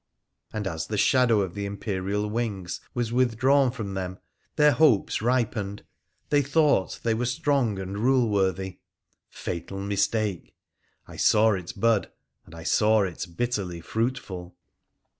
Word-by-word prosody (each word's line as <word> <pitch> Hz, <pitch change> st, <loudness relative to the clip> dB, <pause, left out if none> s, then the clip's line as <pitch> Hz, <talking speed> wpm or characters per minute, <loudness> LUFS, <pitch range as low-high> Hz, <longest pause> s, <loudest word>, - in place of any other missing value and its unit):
And 105 Hz, -1 st, -4 dB
as 80 Hz, -3 st, -3 dB
the 105 Hz, -, -3 dB
shadow 120 Hz, -1 st, +4 dB
of 95 Hz, -3 st, -3 dB
the 100 Hz, 0 st, -4 dB
Imperial 100 Hz, 0 st, -2 dB
wings 105 Hz, -5 st, -3 dB
was 120 Hz, -2 st, -1 dB
withdrawn 130 Hz, +2 st, +3 dB
from 110 Hz, -5 st, -5 dB
them 95 Hz, -1 st, -4 dB, 0.4 s
their 150 Hz, 0 st, +5 dB
hopes 125 Hz, -9 st, +3 dB
ripened; 110 Hz, -4 st, -1 dB, 0.5 s
they 145 Hz, -1 st, +5 dB
thought 145 Hz, -7 st, +2 dB
they 115 Hz, -, +2 dB
were 120 Hz, +2 st, -1 dB
strong 135 Hz, -, +1 dB
and 95 Hz, +1 st, -5 dB
ruleworthy. 100 Hz, -7 st, +1 dB, 0.5 s
Fatal 95 Hz, +3 st, -5 dB
mistake! 100 Hz, 0 st, -1 dB, 0.5 s
I -, -, -11 dB
saw 110 Hz, +1 st, +4 dB
it 90 Hz, -3 st, -5 dB
bud, 115 Hz, -1 st, +2 dB, 0.4 s
and 80 Hz, -, -13 dB
I 80 Hz, -, -9 dB
saw 110 Hz, +4 st, +3 dB
it 90 Hz, -1 st, -4 dB
bitterly 100 Hz, -8 st, -2 dB
fruitful 95 Hz, -3 st, -3 dB
105 Hz, 135 wpm, -26 LUFS, 95-120 Hz, 0.5 s, their